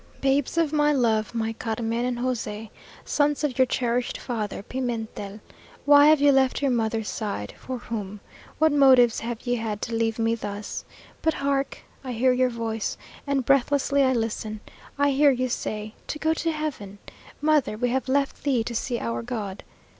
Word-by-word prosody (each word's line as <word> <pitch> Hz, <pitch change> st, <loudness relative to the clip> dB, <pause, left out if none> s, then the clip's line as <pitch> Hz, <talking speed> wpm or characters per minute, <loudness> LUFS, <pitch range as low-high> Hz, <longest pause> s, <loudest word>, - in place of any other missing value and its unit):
"Babes 275 Hz, +3 st, +1 dB
of 320 Hz, -3 st, +2 dB
my 295 Hz, -1 st, +3 dB
love! 230 Hz, -5 st, +1 dB
my 225 Hz, -1 st, -1 dB
Carmen 230 Hz, +1 st, -2 dB
and 250 Hz, -1 st, -1 dB
José! 225 Hz, -4 st, -3 dB, 0.3 s
Sons 295 Hz, 0 st, +1 dB
of 270 Hz, -4 st, -1 dB
your 260 Hz, -, +5 dB
cherished 245 Hz, -1 st, -1 dB
father, 215 Hz, -5 st, -4 dB
Pimentel. 225 Hz, -4 st, -4 dB, 0.4 s
Why 290 Hz, 0 st, +8 dB
have 310 Hz, -1 st, +6 dB
you 285 Hz, 0 st, +5 dB
left 265 Hz, -1 st, +3 dB
your 280 Hz, -2 st, +1 dB
mother's 225 Hz, -2 st, 0 dB
side? 200 Hz, -, -4 dB
for 255 Hz, -1 st, -6 dB
whom? 210 Hz, -4 st, -5 dB, 0.4 s
What 315 Hz, 0 st, +4 dB
motives 260 Hz, -5 st, +6 dB
have 235 Hz, 0 st, -5 dB
ye 245 Hz, -, +1 dB
had 220 Hz, -2 st, -3 dB
to 230 Hz, -, -3 dB
leave 225 Hz, -1 st, 0 dB
me 225 Hz, 0 st, +1 dB
thus? 205 Hz, -2 st, -5 dB, 0.4 s
But 320 Hz, -1 st, +1 dB
hark! 275 Hz, 0 st, -1 dB, 0.2 s
I 255 Hz, -2 st, -4 dB
hear 250 Hz, +2 st, +3 dB
your 255 Hz, 0 st, +2 dB
voice 225 Hz, -2 st, -3 dB, 0.3 s
and 275 Hz, -3 st, 0 dB
breathlessly 280 Hz, +1 st, +3 dB
I 260 Hz, -1 st, +4 dB
listen. 220 Hz, -2 st, -3 dB, 0.4 s
I 285 Hz, 0 st, +3 dB
hear 285 Hz, +2 st, +5 dB
ye 255 Hz, -1 st, +1 dB
say 215 Hz, -2 st, -4 dB
'To -, -, -3 dB
go 315 Hz, +1 st, +1 dB
to 330 Hz, 0 st, -1 dB
heaven! 285 Hz, -11 st, -5 dB, 0.4 s
Mother! 295 Hz, -7 st, +2 dB
we 245 Hz, +2 st, 0 dB
have 265 Hz, +1 st, -1 dB
left 275 Hz, +1 st, 0 dB
thee 265 Hz, -5 st, +1 dB
to 235 Hz, -, -5 dB
see 240 Hz, +1 st, -1 dB
our 230 Hz, 0 st, -3 dB
God!' 220 Hz, -5 st, -5 dB
245 Hz, 175 wpm, -25 LUFS, 225-275 Hz, 0.4 s, Why